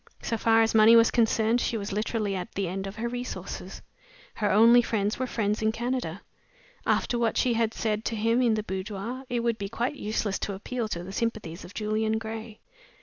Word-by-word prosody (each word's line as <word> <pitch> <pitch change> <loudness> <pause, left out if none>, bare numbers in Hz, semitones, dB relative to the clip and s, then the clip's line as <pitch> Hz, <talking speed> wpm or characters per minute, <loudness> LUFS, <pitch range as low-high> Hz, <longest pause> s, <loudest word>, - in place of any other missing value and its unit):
So 230 - -1
far 225 0 +4
as 225 - +1
money 220 +1 +7
was 230 0 +6
concerned, 225 0 +2
she 230 - -1
was 200 -1 -4
literally 210 0 -1
at 180 -1 -5
the 195 -2 -1
end 190 +2 -4
of 195 - -7
her 230 +1 -3
resources. 245 +1 -6 0.5
Her 210 -2 0
only 230 +4 +7
friends 215 -2 -1
were 260 - -1
friends 210 -3 -1
in 220 0 +2
Canada. 240 -6 -3 0.6
After 240 - +1
what 230 -2 +1
she 250 - +2
had 225 -1 +1
said 215 -1 -1
to 230 - -1
him 230 +3 +2
in 235 -3 +3
the 215 - -2
boudoir, 205 +6 -5
it 240 -1 0
would 230 -1 0
be 200 -1 -4
quite 240 +6 -2
useless 210 -1 -2
to 200 - -3
appeal 230 +4 -3
to 175 -4 -4
the 190 - -8
sympathies 215 -7 -3
of 185 - -12
Julian 220 +1 0
Gray. 220 0 -7
220 Hz, 205 wpm, -27 LUFS, 205-235 Hz, 0.6 s, money